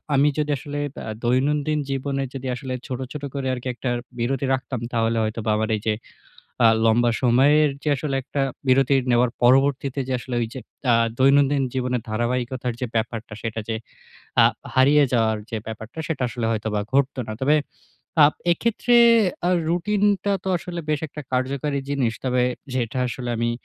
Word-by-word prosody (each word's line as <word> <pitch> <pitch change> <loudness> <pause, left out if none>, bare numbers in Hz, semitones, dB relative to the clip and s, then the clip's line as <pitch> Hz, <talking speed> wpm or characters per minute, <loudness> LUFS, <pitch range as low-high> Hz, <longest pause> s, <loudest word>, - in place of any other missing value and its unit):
আমি 140 +2 +4
যদি 150 0 0
আসলে 145 +2 -6 0.3
আ - - -2
দৈনন্দিন 145 +5 +1
জীবনে 135 0 -2
যদি 135 -1 -5
আসলে 130 -1 -5
ছোট, 130 -2 -4
ছোট 150 -1 -7
করে 135 -2 -3
আরকি 125 0 -5
একটা 125 - -3 0.3
বিরতি 135 +3 0
রাখতাম, 130 -2 -3
তাহলে 115 -1 +1
হয়তোবা 110 0 -3
আমার 110 +1 -1
এইযে 105 +1 -1 0.7
আ - - +9 0.2
লম্বা 120 +1 +4
সময়ের 140 +5 +4
যে 150 - 0
আসলে 140 0 -3
একটা 140 0 -3 0.3
বিরতি 135 +1 +4 0.2
নেওয়ার 120 0 +3
পরবর্তীতে 135 +2 +3
যে 130 - -1
আসলে 125 0 -5
ঐযে 115 +3 -4 0.3
আ - - +5 0.3
দৈনন্দিন 140 +1 +4
জীবনের 125 -2 -1
ধারাবাহিকতার 120 +2 -1
যে - - +1
ব্যাপারটা, 115 -1 -2
সেটা 115 -1 -3
যে 110 - -1 0.7
আ - - +7 0.3
হারিয়ে 140 +3 +5
যাওয়ার 110 -2 +2
যে 115 - -2
ব্যাপারটা, 110 +5 -8
সেটা 160 -5 -2
আসলে 120 -1 -3
হয়তোবা 105 -1 -1
ঘটতো 135 -1 +2
না। - - -3
তবে 150 +3 +4 0.7
আ - - +10 0.3
এক্ষেত্রে 235 +5 +1 0.5
আ - - +3 0.2
রুটিনটা 200 +3 +1
তো 190 - -2
আসলে 175 0 -6
বেশ 150 -1 0
একটা 150 +1 -8
কার্যকারী 140 +3 -1
জিনিস। 130 -5 +1
তবে 125 -1 +2 0.3
যেটা 125 0 -1
আসলে 120 0 -4
আমি 115 0 +1
130 Hz, 160 wpm, -23 LUFS, 120-145 Hz, 0.7 s, আ